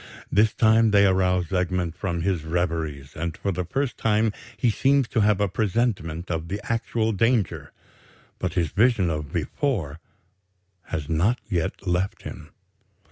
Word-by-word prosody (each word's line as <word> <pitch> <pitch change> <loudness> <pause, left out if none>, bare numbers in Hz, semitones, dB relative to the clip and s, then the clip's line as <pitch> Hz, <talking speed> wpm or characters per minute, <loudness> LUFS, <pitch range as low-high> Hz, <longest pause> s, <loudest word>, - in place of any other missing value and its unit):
This 105 +2 +4
time 110 0 +4
they 100 -1 +5
arouse 90 -2 +2
Egmont 90 -2 0
from 85 -4 -2
his 90 -4 0
reveries; 80 -4 -2
and 80 0 -4
for 100 - -1
the 90 -1 -2
first 135 +8 -2
time 110 0 +2 0.2
he 115 +2 +2
seems 135 +3 +2
to - - 0
have 105 -1 +3
a 100 - +2
presentiment 95 -5 -1
of 80 0 -2
the 100 +4 -3
actual 115 -1 0
danger. 110 -2 0 0.7
But 95 -3 -2
his 85 -4 +1
vision 105 -6 +3
of 75 -2 -4
before 85 - -2 0.9
has 75 -3 -4
not 85 +10 +2
yet 90 +2 -2
left 90 +2 -1
him. - - -8
95 Hz, 150 wpm, -24 LUFS, 85-110 Hz, 0.9 s, they